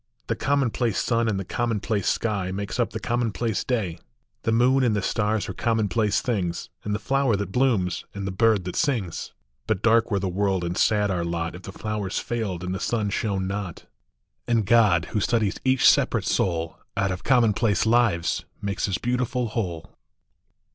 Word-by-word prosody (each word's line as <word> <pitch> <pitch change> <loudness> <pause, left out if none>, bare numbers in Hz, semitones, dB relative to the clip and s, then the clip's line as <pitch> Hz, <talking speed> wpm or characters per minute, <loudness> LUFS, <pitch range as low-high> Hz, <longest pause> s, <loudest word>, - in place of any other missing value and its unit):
The - - -1
commonplace 130 -5 0
sun 115 -1 +1
in 105 -3 0
the 95 - -4
commonplac 110 -3 -1
sky, 100 -5 0
Makes 100 +5 -4
up 120 - +2
the - - -5
commonplace 115 -2 -1
day; 100 -10 -2 0.4
The 115 - 0
moon 125 +4 +4
and 115 -4 +2
the 105 - 0
stars 105 -1 0
are 95 - -4
commonplace 110 0 +1
things, 95 -8 -2
And 105 0 -1
the - - -3
flower 135 +1 +1
that 100 -2 -3
blooms, 110 -7 +1
and 100 -1 -4
the 100 - -2
bird 105 0 +3
that 90 - -4
sings: 115 - -1 0.4
But 110 -4 -1
dark 115 0 +4
were 100 - +1
the 95 0 -1
world 95 0 0
and 85 +1 -2
sad 105 -1 +2
our 90 -2 -1
lot 85 -1 -2
If 90 - -9
the 95 - -8
flowers 105 -2 -3
failed 105 -7 -3
and 90 0 -3
the 95 - -3
sun 105 -2 -1
shone 100 -2 -1
not; 95 -3 -5 0.6
And 115 -3 +2
God, 100 -6 +4
who 110 - +2
studies 110 -1 0
each 130 0 +4
separate - - +3
soul, 85 -3 -1 0.2
Out 100 -1 +1
of 90 - -5
commonplace 115 -5 +3
lives 110 -7 +2
makes 100 0 -2
his 95 -2 0
beautiful 125 0 -1
whole. 90 -8 -4
105 Hz, 180 wpm, -25 LUFS, 95-115 Hz, 0.6 s, moon